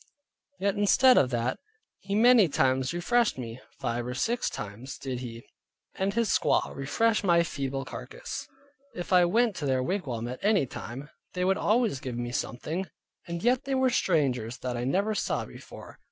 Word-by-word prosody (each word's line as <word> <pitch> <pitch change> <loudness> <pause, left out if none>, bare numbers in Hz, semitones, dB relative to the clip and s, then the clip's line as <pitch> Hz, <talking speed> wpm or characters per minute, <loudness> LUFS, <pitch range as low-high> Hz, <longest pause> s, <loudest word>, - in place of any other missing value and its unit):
Yea, 200 - +2
instead 205 +6 +5
of 130 - +4
that, 120 0 -1 0.4
he 200 - -3
many 230 -4 +6
times 130 -1 +1
refreshed 220 - +1
me; 120 0 -7 0.2
five 120 0 -2
or 125 - -4
six 235 - 0
times 105 +6 -7
did 130 -3 -4
he 115 -2 -7 0.5
and 195 +2 -1
his 230 -3 +1
squaw - - +1
refresh 215 +12 +1
my 170 -3 +4
feeble 135 -3 -3
carcass. - - -7 0.5
If 175 +1 -4
I 180 -1 +7
went 225 +3 +2
to 145 - -2
their 130 -1 +1
wigwam 130 - -2
at 125 +1 -6
any 205 -7 +3
time, 130 +3 -8 0.2
they 180 0 0
would 190 +1 +2
always 220 - +2
give 125 -3 -5
me 120 0 -3
something, 155 +9 -3 0.4
and 170 0 -5
yet 250 +3 +2
they 270 0 0
were 260 -1 +3
strangers 130 - +1
that 125 -1 -2
I 120 +1 -2
never 200 +10 +1
saw - - -1
before. - - -12
165 Hz, 175 wpm, -28 LUFS, 125-205 Hz, 0.5 s, I